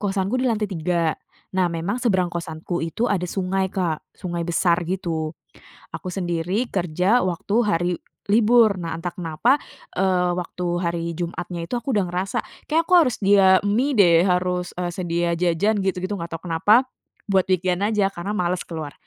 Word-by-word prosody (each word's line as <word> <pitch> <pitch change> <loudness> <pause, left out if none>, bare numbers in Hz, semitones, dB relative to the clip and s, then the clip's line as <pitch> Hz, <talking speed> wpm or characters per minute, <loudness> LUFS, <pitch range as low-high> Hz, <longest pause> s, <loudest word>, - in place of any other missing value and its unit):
Kosanku 195 +2 -1
di 255 - +1
lantai 215 -2 0
tiga, 170 -3 0 0.4
nah 185 -2 +2
memang 170 +8 -3
seberang 185 -8 +1
kosanku 170 +1 -4
itu 165 +8 -2
ada 180 -5 -1
sungai 190 0 -1
Kak, 170 -5 -1 0.2
sungai 175 -2 -4
besar 170 +1 +2
gitu. 165 -4 -2 0.6
Aku 185 - -5
sendiri 180 +5 -1
kerja 185 +6 +1
waktu 185 +2 -2
hari 175 -4 +1 0.4
libur, 225 0 +5
nah 165 -1 -4
entah 175 +1 -5
kenapa, 180 - +1 0.4
eee, 180 -1 +2
waktu 180 0 -4 0.2
hari 170 -1 -1
Jumatnya 175 0 -4
itu 245 - 0
aku 255 +2 -2
udah 200 - +3
ngerasa 185 +2 -2 0.3
kayaknya 320 +2 +3
aku 365 - -6
harus 255 -8 +3
sedia 200 -1 +4 0.2
mie 245 +8 +1
deh, 170 -5 +6
harus 180 -1 0
e 180 - -3
sedia 170 -1 -1
jajan 180 +5 +1
gitu-gitu, 190 0 -2
gak 170 - -5
tau 165 - -7
kenapa, 205 +9 +4 0.5
buat 190 -2 +3
weekend 185 0 +1
aja 210 -2 +1
karena 195 +5 -4
males 180 -1 -1
keluar. 155 -4 -6
180 Hz, 165 wpm, -23 LUFS, 170-205 Hz, 0.6 s, deh